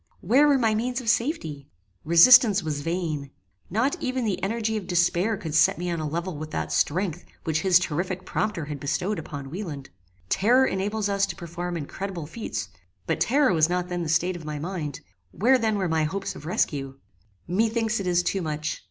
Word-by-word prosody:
Where 260 +10 +4
were 285 -2 +4
my 225 -4 +2
means 245 +4 -1
of 240 -4 -3
safety? 190 - -1 0.3
Resistance 200 +5 +7
was 150 -2 -3
vain. 160 -4 -3 0.4
Not 235 +9 0
even 255 -1 -1
the 195 -3 -1
energy 220 +3 -1
of 205 -4 -4
despair 175 +4 +2
could 160 -5 -6
set 160 - +4
me 175 +1 -3
on 170 - -2
a 155 - -2
level 170 +3 -3
with 155 +1 -6
that - - -3
strength 175 +1 0 0.2
which 160 -1 0
his 185 -2 +5
terrific 180 +2 -2
prompter 210 -8 -2
had 145 -1 -6
bestowed 175 +8 -1
upon 140 -3 -7
Wieland. 155 -7 -6 0.4
Terror 245 - +4
enables 205 +1 -1
us 200 -1 +1
to - - -5
perform 175 +1 -5
incredible 170 +2 -5
feats; 155 - -5 0.4
but - - -1
terror 270 -3 +3
was 160 -1 +3
not 180 0 -1
then 175 -1 -2
the 165 - -3
state 175 +3 +1
of 170 - -8
my 150 -1 -5
mind: 155 -3 -5 0.3
where 255 - +3
then 220 -2 +1
were 190 -2 0
my 160 -1 +1
hopes 195 +5 -4
of 150 - -9
rescue? 135 -5 -1 0.5
Methinks 225 +4 +1
it 195 - -3
is 175 0 +2
too 190 +2 -1
much. 155 -1 -3
180 Hz, 195 wpm, -25 LUFS, 155-215 Hz, 0.5 s, Resistance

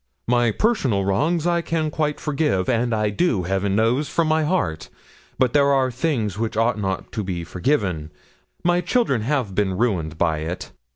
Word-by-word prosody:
'"My 120 -1 +3
personal 125 - +1
wrongs 155 - +1
I 170 -1 +2
can 160 -2 -1
quite 150 -1 -1
forgive, 145 - 0
and 120 0 +1
I 105 -2 +1
do, 110 - +1
Heaven 95 +2 0
knows, 120 +7 +1
from 170 -1 +1
my 155 0 +2
heart; 150 - -1 0.5
but 125 -2 +2
there 140 -1 +4
are 130 -2 +2
things 115 - -1
which 110 -1 -2
ought 115 -1 +2
not 95 -2 -3
to 110 - -3
be 90 -3 -3
forgiven. 90 - -1 0.5
My 175 +1 +3
children 180 - +1
have 125 -4 -1
been 95 -2 0
ruined 90 -9 -1
by 80 -2 +1
it. 80 +3 -5
115 Hz, 175 wpm, -22 LUFS, 95-150 Hz, 0.5 s, there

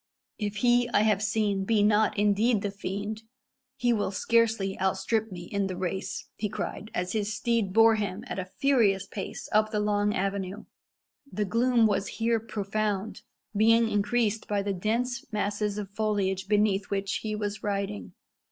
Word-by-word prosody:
"If 210 -1 -2
he 245 0 +4
I - - +6
have 210 -2 +2
seen 210 -2 0
be 210 +1 +2
not 210 +1 +3
indeed 210 +2 +2
the 205 - -1
fiend, 205 +2 -4 0.6
he 245 -1 +2
will 205 -3 0
scarcely 220 -1 +1
outstrip 215 +3 0
me 175 -1 -7
in 200 +2 -2
the 185 - -4
race," 190 +1 -3
he 210 - -2
cried, 215 0 -5
as 180 0 -1
his 215 -1 -1
steed 225 -2 0
bore 225 +2 +6
him 200 -3 -3
at - - -4
a 185 - -3
furious 205 -4 +2
pace 195 0 -6
up 215 0 +3
the 215 -1 -1
long 210 0 +1
avenue. 195 +2 -3 0.7
The 210 - -1
gloom 235 +3 +3
was 205 -2 +1
here 230 0 +2
profound, 210 -1 -3 0.3
being 225 +2 +5
increased 220 +1 0
by 205 -1 0
the 200 0 -1
dense 235 +6 -2
masses 205 0 -1
of 205 -2 -5
foliage 200 -3 -1
beneath 205 -1 +2
which 195 -1 -1
he 215 -1 -3
was 205 -1 -3
riding. 195 - -3
210 Hz, 165 wpm, -28 LUFS, 195-220 Hz, 0.7 s, I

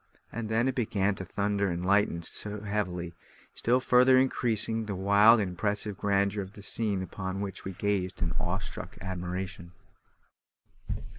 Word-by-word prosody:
And 115 -1 -4
then 115 +3 +2
it 130 - +1
began 105 -5 0
to 95 - -6
thunder 100 +1 0
and 85 +1 -3
lighten 100 -3 +2 0.4
heavily, 90 -5 -2 0.4
still 125 +2 +2
further 130 0 +5
increasing 115 -4 +1
the 100 - -3
wild 100 +4 +6
and 100 -3 0
impressive 105 +2 -1
grandeur 100 +1 +1
of 95 +1 -8
the 100 - -11
scene 105 -4 0
upon 95 0 -5
which 100 -2 -5
we 95 - -4
gazed 95 -1 -1
in 85 - -1
awe 90 +1 -1
struck 95 - -7
admiration. 90 -1 -5
100 Hz, 150 wpm, -29 LUFS, 95-110 Hz, 0.4 s, wild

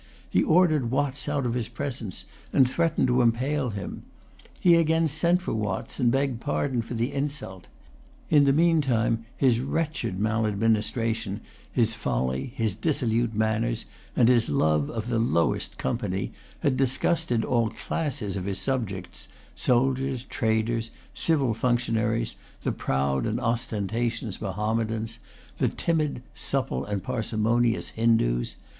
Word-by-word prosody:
He 90 - +2
ordered 155 - +3
Watts 140 +2 -1
out 145 -2 0
of 120 - 0
his 120 -2 -1
presence, 120 -5 -4 0.3
and 130 - +5
threatened 165 +5 +1
to 125 0 +3
impale 130 +4 +1
him. 100 -2 -5 0.6
He 175 - +5
again 165 0 +4
sent 170 +4 +2
for - - -2
Watts, 105 0 -3
and 120 -3 +3
begged 135 -2 0
pardon 135 -4 0
for 115 +2 -6
the 120 +4 -1
insult. 140 -10 -4 0.6
In 145 -2 +6
the 140 - +5
meantime, 135 -8 +2
his 125 -4 +3
wretched 150 - -2
maladministration, 110 0 0 0.3
his 115 -3 +2
folly, 65 - -1
his 110 -4 0
dissolute 120 - 0
manners, 110 +1 0 0.3
and 120 - +5
his 120 -2 +4
love 75 0 +2
of 110 0 -4
the 120 -2 +1
lowest 85 -8 +1
company, - - -2 0.3
had 130 -2 +2
disgusted 135 -1 +1
all 115 -3 +2
classes 125 - -3
of 95 -2 -3
his 100 -1 -1
subjects, 95 - -3 0.3
soldiers, 130 - +1
traders, 115 -1 0 0.2
civil 140 -8 +1
functionaries, 115 -1 0 0.3
the - - +1
proud 65 +4 0
and 110 +2 -1
ostentatious 115 -2 -2
Mahommedans, 110 +2 -2 0.4
the - - +3
timid, 155 -6 -1
supple, 135 -1 -2
and 100 -2 -3
parsimonious 115 +1 0
Hindoos. 110 - +1
115 Hz, 130 wpm, -26 LUFS, 110-135 Hz, 0.6 s, In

